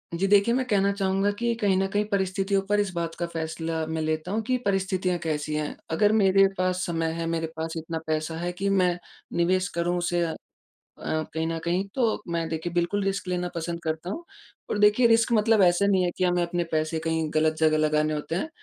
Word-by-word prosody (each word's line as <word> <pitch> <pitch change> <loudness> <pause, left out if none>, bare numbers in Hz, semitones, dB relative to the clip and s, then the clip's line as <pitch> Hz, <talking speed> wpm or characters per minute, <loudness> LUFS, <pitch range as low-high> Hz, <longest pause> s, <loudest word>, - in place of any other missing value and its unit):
जी 195 +3 0
देखिए, 205 +3 +4
मैं 260 - 0
कहना 200 -2 +2
चाहूँगा 195 0 +1
कि 235 0 +1
कहीं 205 -4 +1
न 195 0 +1
कहीं 205 +2 0
परिस्थितियों 195 0 +1
पर 205 0 +3
इस 205 -2 0
बात 170 -1 -3
का 175 - -2
फैसला 160 0 -3
मैं 160 0 -3
लेता 155 +3 -2
हूँ 220 +2 0
कि 255 +3 0
परिस्थितियाँ 190 -2 0
कैसी 150 -1 -2
हैं? 150 -1 -2 0.2
अगर 205 +5 +3
मेरे 195 +1 +5
पास 185 0 0
समय 165 -1 -1
है, 165 - -2
मेरे 165 0 -1
पास 160 0 -3
इतना 160 0 -4
पैसा 155 +1 -1
है 175 +1 -2
कि 195 +2 -2
मैं 180 -3 +2 0.4
निवेश 185 +2 +2
करूँ 175 +1 +1
उसे 175 0 0
अ, 160 -1 -2 1.0
कहीं 160 0 -1
न 165 0 -2
कहीं 175 +3 0
तो 230 -5 +1
मैं 165 -1 -1
देखिए 160 +1 -4
बिल्कुल 175 +4 0
रिस्क 195 -1 -2
लेना 180 0 -1
पसँद 170 0 -3
करता 160 +2 -3
हूँ। 335 - -5 0.5
और - - -1
देखिए 210 +4 +5
रिस्क 230 +1 +3
मतलब 220 -1 +4
ऐसा 175 +2 +4
नहीं 195 -2 +3
है 175 - +1
कि 185 - 0
हमें 175 -1 +2
अपने 175 0 -1
पैसे 155 +1 0
कहीं 160 -1 0
गलत 155 0 +3
जगह 155 -1 +3
लगाने 155 0 +2
होते 150 +2 -4
हैं। 250 - -2
175 Hz, 215 wpm, -26 LUFS, 160-195 Hz, 1.0 s, मेरे